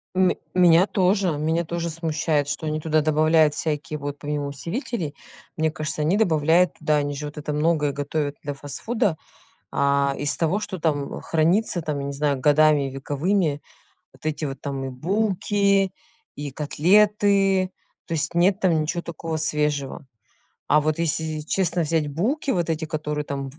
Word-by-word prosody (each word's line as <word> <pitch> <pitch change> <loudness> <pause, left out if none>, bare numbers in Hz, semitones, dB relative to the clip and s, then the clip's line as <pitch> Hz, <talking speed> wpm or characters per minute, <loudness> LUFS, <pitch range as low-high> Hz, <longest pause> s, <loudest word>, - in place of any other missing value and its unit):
Ме 185 -1 +3 0.2
меня 180 +1 +5
тоже, 185 -5 +1
меня 160 +3 0
тоже 170 0 -3
смущает, 160 -2 -1
что 145 +2 -3
они 155 0 -1
туда 155 0 +1
добавляют 155 0 +3
всякие 150 -1 -3
вот 145 0 -5
помимо 145 -1 -3
усилителей, 165 - -4 0.4
мне 160 0 +2
кажется, 155 0 -3
они 170 +6 +2
добавляют 165 -3 +3
туда, 155 - +1
они 145 0 -1
же 150 - -5
вот 150 +1 -8
это 150 0 -4
многое 150 -1 +1
готовят 145 +1 -3
для 145 -1 -4
фастфуда, 180 - -2 0.5
а, 140 0 +2
из 145 0 -1
того, 170 +5 0
что 190 -3 -5
там, 145 -3 -1
э, - - -12
хранится 170 +3 +1
там, 150 -2 -3
я 140 - -4
не - - -3
знаю, 140 0 0
годами 150 -1 +4
вековыми, 145 +4 -1 0.5
вот - - -21
эти 155 0 -2
вот 135 -1 -5
там 135 -2 -4
и 135 - -4
булки, 195 +4 +1 0.5
и 145 0 -5
котлеты. 195 +5 +3 0.4
То 165 - -3
есть 155 +1 -1
нет 185 +3 +3
там 170 -4 +3
ничё 170 +3 -2
такого 165 -1 -5
свежего. 150 -3 -1 0.6
А 150 +1 +4
вот 155 +1 0
если 160 -1 -1
честно 175 +2 0
взять 160 -1 0
булки, 230 - -1
вот 175 -8 0
эти, 160 0 -1
которые 150 -2 -3
там 140 -1 -4
в - - -17
155 Hz, 170 wpm, -23 LUFS, 145-175 Hz, 0.6 s, меня